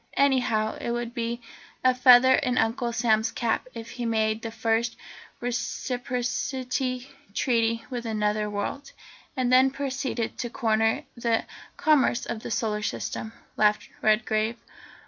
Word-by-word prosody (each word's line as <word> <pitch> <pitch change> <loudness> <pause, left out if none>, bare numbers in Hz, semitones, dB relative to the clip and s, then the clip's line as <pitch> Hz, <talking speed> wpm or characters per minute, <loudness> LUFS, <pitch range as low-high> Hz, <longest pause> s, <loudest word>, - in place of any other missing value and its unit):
Anyhow, 245 -6 +2
it - - -3
would 240 0 -2
be 235 0 -3 0.4
a 255 0 +5
feather 250 +1 +7
in 255 -2 +1
Uncle 235 +2 +1
Sam's 220 -2 +2
cap 235 +1 -1
if 230 0 -7
he 245 -1 -4
made 220 -1 +1
the 230 - -4
first 225 +1 0 0.4
Reciprocity 250 +1 -2 0.3
Treaty 230 -2 +1
with 240 -2 -4
another 210 -1 0
world." 210 +7 -4 0.4
"And 255 -1 +1
then 260 +1 +6
proceeded 265 -4 -3
to 240 - -2
corner 225 -2 +1
the 235 -2 0 0.3
commerce 280 -5 +3
of 225 - -4
the - - -6
Solar 215 -2 -1
System," 220 +1 -3 0.3
laughed 210 0 +2
Redgrave. 215 +1 +2
235 Hz, 130 wpm, -26 LUFS, 220-250 Hz, 0.4 s, feather